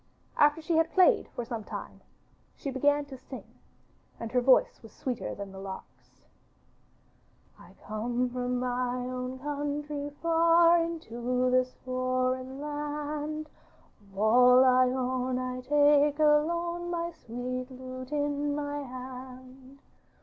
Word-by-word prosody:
After 295 +2 +3
she 325 0 +1
had 325 0 +2
played 370 -2 +5
for 240 - -3
some 230 -2 -5
time - - -8 0.5
she 275 - -5
began 290 +2 +2
to 270 -2 -10
sing, 260 - -9 0.8
and 230 -1 -5
her 250 - +2
voice 375 - +4
was - - -13
sweeter 255 -4 -4
than 200 -1 -7
the 190 - -10
lark's: 195 -1 -11 1.4
'I - - -16
come 235 +4 -1
from 250 0 -2
my 250 0 -1
own 255 +1 -4
country 290 +1 -3
far 335 +1 +5
Into 250 -6 -2
this 255 0 +2
foreign 255 +1 -1
land, 295 +1 -4 0.6
Of 195 - -17
all 250 +4 +6
I 255 0 +5
own 255 0 -1
I 255 0 -3
take 290 +2 +4
alone 340 +3 +2
My 340 0 -2
sweet 255 -3 -5
lute 255 0 -9
in 290 0 -1
my 290 0 -3
hand. 255 +1 -10
260 Hz, 130 wpm, -29 LUFS, 250-295 Hz, 1.4 s, all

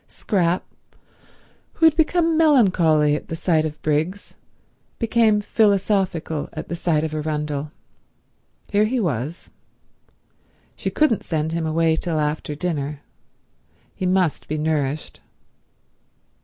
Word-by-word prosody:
Scrap, 180 -3 -1 1.1
who 325 - +2
had 320 -1 +6
become 330 0 +2
melancholy 180 - +4
at - - -6
the 165 - -4
sight 160 -2 +1
of 155 -1 -5
Briggs, 160 +6 -2 0.6
became 225 -2 +2
philosophical 195 -8 0
at 155 - -7
the 170 - -2
sight 165 -3 0
of 155 -1 -3
Arundel. 150 -1 -3 1.0
Here 210 0 +3
he 245 +4 0
was. 155 - -3 1.2
She - - -3
couldn't 300 -9 +2
send 160 -1 -2
him 165 -1 -2
away 160 0 +2
till 160 -1 -2
after 150 0 -2
dinner. 150 -3 -3 0.9
He 185 - -3
must 185 -4 +1
be 155 - -2
nourished. 150 -1 -2
165 Hz, 115 wpm, -22 LUFS, 150-205 Hz, 1.2 s, had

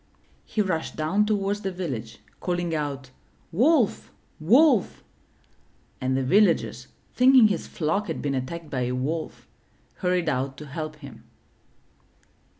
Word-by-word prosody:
He 215 - 0
rushed 165 -5 -3
down 190 +7 +1
toward 205 -1 0
the 195 -2 -4
village, 135 -12 -6 0.2
calling 175 -2 -2
out, 140 -4 -4 0.4
''Wolf! 250 - +2 0.3
Wolf!'' 240 - +3 1.0
and 130 0 0
the 135 - 0
villagers, 200 +10 +2 0.3
thinking 250 -3 +6
his 190 -5 -3
flock 190 +6 -1
had - - -3
been 140 -1 -2
attacked 150 +5 -5
by 130 - -1
a 125 - -2
wolf, 155 +6 -4 0.5
hurried 180 -2 0
out 135 -1 -1
to 150 - -9
help 155 +1 -6
him. 140 -6 -13
165 Hz, 130 wpm, -25 LUFS, 140-205 Hz, 1.0 s, thinking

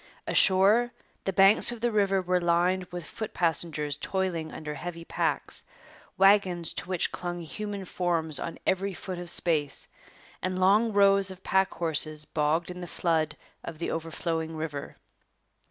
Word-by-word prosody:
Ashore, 205 +6 +4 0.3
the 195 - 0
banks 195 +4 +6
of 240 - -7
the 240 +1 0
river 195 -3 +2
were 180 0 +1
lined 175 +2 +1
with 175 -2 -8
foot 220 -2 -7
passengers 150 -3 0
toiling 175 -2 -2
under 150 -1 -6
heavy 170 +3 -7
packs, - - 0 0.6
wagons 190 -3 +3
to - - -6
which 185 -3 0
clung 175 -1 -5
human 200 +4 -6
forms 170 -4 0
on 165 - -5
every 190 0 0
foot 185 -1 -6
of 175 -1 -6
space, 155 -5 +1 0.5
and 185 0 -2
long 210 +5 +4
rows 200 -1 +4
of 190 0 -10
pack 190 0 +1
horses 155 -2 -1
bogged 160 +4 0
in 180 0 -8
the 175 - -6
flood 165 -3 -1 0.3
of 165 - -7
the 170 - -3
overflowing 165 0 -3
river. 150 -3 -5
175 Hz, 155 wpm, -27 LUFS, 165-195 Hz, 0.6 s, banks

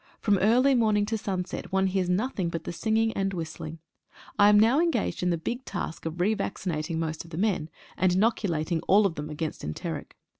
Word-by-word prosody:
From 205 -3 +2
early 245 +7 +4
morning 215 -4 +3
to 220 +2 -2
sunset 195 -4 -4
one 190 0 +2
hears 190 -1 0
nothing 190 -1 0
but 165 -1 -4
the - - -5
singing 220 +4 +1
and 195 -1 -1
whistling. 160 -1 -6 0.6
I 205 0 +7
am 205 0 +6
now 230 +7 +5
engaged 330 -9 0
in 180 - +1
the 170 - +1
big 240 +10 -4
task 165 - -5
of 165 +2 -6
re 200 +5 +3
vac 200 - -3
cinating 160 -2 -3
most 160 -1 -3
of 165 - -14
the 160 - -7
men, 185 -6 0 0.3
and 185 -1 +3
inoculating 180 -5 +1
all 205 +2 +5
of 190 - +1
them 150 -1 -6
against 155 +1 -4
enteric. 75 +1 -5
190 Hz, 210 wpm, -27 LUFS, 165-215 Hz, 0.6 s, I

